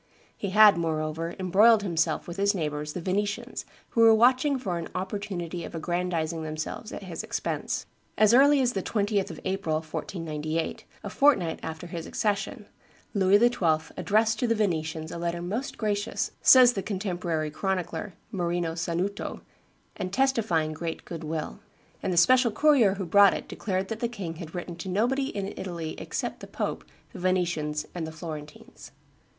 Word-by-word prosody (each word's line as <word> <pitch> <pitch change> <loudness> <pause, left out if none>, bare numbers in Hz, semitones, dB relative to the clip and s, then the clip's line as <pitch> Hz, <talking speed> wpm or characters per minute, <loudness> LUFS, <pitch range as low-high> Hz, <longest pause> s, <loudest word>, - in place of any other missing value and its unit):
He 200 - -4
had, 210 -2 +7
moreover, 160 +1 -2
embroiled 205 +4 +5
himself 165 -4 0
with 175 +1 -7
his 200 +1 +2
neighbors 150 -3 -3
the 180 - -4
Venetians, 205 +6 -2 0.2
who 230 - +1
were 225 -1 +8
watching 255 +5 +4
for 185 -9 -3
an 165 - -5
opportunity 185 -3 -4
of - - -7
aggrandizing 170 -1 -2
themselves 155 +7 -5
at - - -7
his 175 -4 -5
expense. - - -3 0.3
As 215 +1 +5
early 280 +2 +6
as 250 -1 +1
the 195 - -1
20th 205 -1 0
of - - -8
April, 190 -5 -1
1498, 160 0 -4 0.2
a - - -4
fortnight 250 - +3
after 160 +1 -6
his 170 -1 -6
accession, 210 +2 -2 0.5
Louis 195 0 +5
XII. 170 -9 +2
addressed 220 +1 +2
to 245 - +1
the 230 - +2
Venetians 160 -6 -1
a 170 - -5
letter 170 0 -2
"most 210 +10 -4
gracious," 210 0 -1
says 250 -2 +8
the 195 - -2
contemporary 175 -6 -2
chronicler 180 +1 -3 0.2
Marino 175 -3 -1
Sanuto, 175 +4 -3 0.5
"and 185 - -4
testifying 215 -11 +1
great 165 +1 -5
good 165 -2 -7
will;" 155 - -4 0.4
and - - -1
the 175 - -1
special 245 +8 +5
courier 235 -4 +4
who 195 -1 -4
brought 200 +3 +6
it - - -6
declared 190 -2 -2
that 225 - -4
the 235 - 0
king 190 -9 -6
had 165 0 -8
written 175 -1 -5
to 185 - -6
nobody 245 +8 +1
in 200 -5 -4
Italy 170 -4 -5
except - - -4
the - - -9
pope, - - -3 0.3
the - - -8
Venetians, 175 -5 0
and 170 -3 -4
the - - -6
Florentines. 155 -2 -9
185 Hz, 165 wpm, -27 LUFS, 165-210 Hz, 0.5 s, were